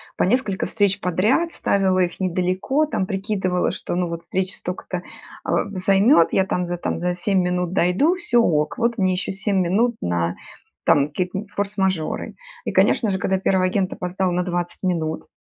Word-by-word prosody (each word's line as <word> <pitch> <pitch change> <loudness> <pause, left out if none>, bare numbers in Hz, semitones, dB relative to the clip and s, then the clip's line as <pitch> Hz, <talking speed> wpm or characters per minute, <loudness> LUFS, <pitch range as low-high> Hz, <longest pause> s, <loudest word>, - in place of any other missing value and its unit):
по - - +1
несколько 205 -2 0
встреч 200 -2 +1
подряд, 215 - +1
ставила 190 -2 +1
их 175 -1 0
недалеко, 185 - 0
там 195 -11 -2
прикидывала, 190 -2 -1
что, - - -4
ну 180 0 0
вот, 170 0 -5
встреча 190 +1 -2
столько-то, 180 0 -5 0.4
а, - - 0
займет, 195 - +4
я 190 - +3
там 180 -2 -1
за, 175 0 -3
там 165 - -3
за 175 0 -1
7 190 +1 +1
минут 180 0 -1
дойду- 195 - +3
всё 240 -9 +2
ок, 155 - +1
вот 235 -2 0
мне 185 -1 +2
еще 185 +1 -2
7 195 +1 -1
минут 220 +7 +2
на, 85 0 -1 0.5
там, 145 0 +4
какие-то 180 +6 -3
форс-мажоры. 190 -5 -1 0.3
И, - - -1
конечно 220 - +3
же, 190 - 0
когда 190 0 0
1 190 -1 +2
агент 185 0 0
опоздал 180 0 -2
на 180 +1 0
20 175 0 -3
минут 160 -3 -1
185 Hz, 175 wpm, -22 LUFS, 180-200 Hz, 0.5 s, займет